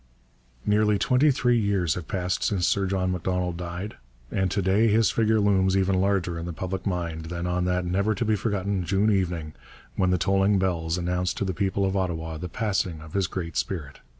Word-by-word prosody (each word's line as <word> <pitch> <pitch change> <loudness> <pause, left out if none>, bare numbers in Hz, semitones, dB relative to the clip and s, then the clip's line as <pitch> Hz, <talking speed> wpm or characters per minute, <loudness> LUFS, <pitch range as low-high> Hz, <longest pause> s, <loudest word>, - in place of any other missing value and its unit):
Nearly 105 0 +3
twenty 130 +7 +3
three 125 -3 +2
years 100 -7 +1
have 90 -3 -6
passed 90 -1 -1
since 95 -4 +1
Sir 100 -1 +1
John 95 -1 0
Macdonald 90 0 -1
died, 90 +4 -6 0.3
and 95 -1 +1
to 100 - -1
day 100 +5 +3
his 110 +1 +3
figure 110 -1 +2
looms 95 -2 +3
even 95 -1 +2
larger 95 -4 0
in 85 - -5
the 85 - -4
public 95 +2 -4
mind 85 -4 -3
than 85 +1 -4
on 90 0 0
that 90 0 0
never 100 +5 +1
to 115 - -1
be 110 0 +2
forgotten 100 -3 -1
June 100 +5 +2
evening 90 -6 -1 0.4
when 95 - +2
the 90 - +3
tolling 95 +2 +2
bells 85 -3 0
announced 90 0 -1
to 100 - -1
the 95 - -1
people 100 +1 0
of 95 0 -1
Ottawa 80 -4 -2
the 90 +3 -6
passing 95 -4 -1
of 80 0 -12
his 95 -3 +1
great 85 -2 -5
spirit. 80 -8 -3
95 Hz, 205 wpm, -26 LUFS, 90-100 Hz, 0.4 s, Nearly